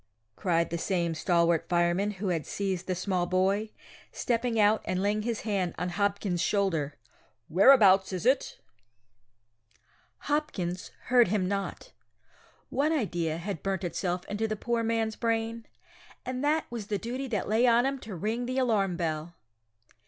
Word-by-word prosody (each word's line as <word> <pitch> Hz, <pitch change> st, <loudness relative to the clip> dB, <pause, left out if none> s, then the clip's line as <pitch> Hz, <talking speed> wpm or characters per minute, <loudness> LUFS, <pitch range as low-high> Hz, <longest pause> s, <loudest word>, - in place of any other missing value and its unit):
cried 170 Hz, -3 st, 0 dB
the 170 Hz, -, -2 dB
same 170 Hz, -2 st, 0 dB
stalwart 170 Hz, 0 st, +1 dB
fireman 175 Hz, +3 st, +2 dB
who 200 Hz, -1 st, -3 dB
had 165 Hz, -3 st, 0 dB
seized 190 Hz, -3 st, -3 dB
the 185 Hz, -, 0 dB
small 180 Hz, -1 st, -1 dB
boy, 195 Hz, +4 st, +1 dB, 0.4 s
stepping 230 Hz, -1 st, -1 dB
out 210 Hz, +1 st, +4 dB
and 185 Hz, -, -2 dB
laying 205 Hz, +2 st, +1 dB
his 230 Hz, 0 st, -2 dB
hand 195 Hz, -5 st, -1 dB
on 180 Hz, -, -2 dB
Hopkins's 200 Hz, -2 st, -1 dB
shoulder, 165 Hz, -8 st, 0 dB, 0.5 s
whereabouts 195 Hz, -, +6 dB
is 185 Hz, +2 st, -4 dB
it? 260 Hz, +2 st, +2 dB, 1.6 s
Hopkins 195 Hz, -, -2 dB, 0.2 s
heard 245 Hz, -3 st, +6 dB
him 190 Hz, -1 st, 0 dB
not. 195 Hz, 0 st, -4 dB, 0.8 s
One 295 Hz, +3 st, +1 dB
idea 175 Hz, -, -1 dB
had 175 Hz, 0 st, -5 dB
burnt 195 Hz, -1 st, -2 dB
itself 180 Hz, 0 st, -2 dB
into 215 Hz, +2 st, -2 dB
the 215 Hz, -, -2 dB
poor 235 Hz, +2 st, -1 dB
man's 225 Hz, -1 st, 0 dB
brain, 230 Hz, 0 st, -2 dB, 0.6 s
and 255 Hz, +1 st, -3 dB
that 305 Hz, +2 st, +2 dB
was 225 Hz, -4 st, -5 dB
the 210 Hz, -, -1 dB
duty 250 Hz, +6 st, -4 dB
that 215 Hz, -6 st, -2 dB
lay 225 Hz, +4 st, +3 dB
on 240 Hz, +1 st, +4 dB
him 275 Hz, 0 st, -1 dB
to 215 Hz, -5 st, -8 dB
ring 225 Hz, +7 st, -2 dB
the 255 Hz, +1 st, -2 dB
alarm 205 Hz, -8 st, +1 dB
bell! 165 Hz, 0 st, -3 dB
200 Hz, 150 wpm, -28 LUFS, 180-230 Hz, 1.6 s, whereabouts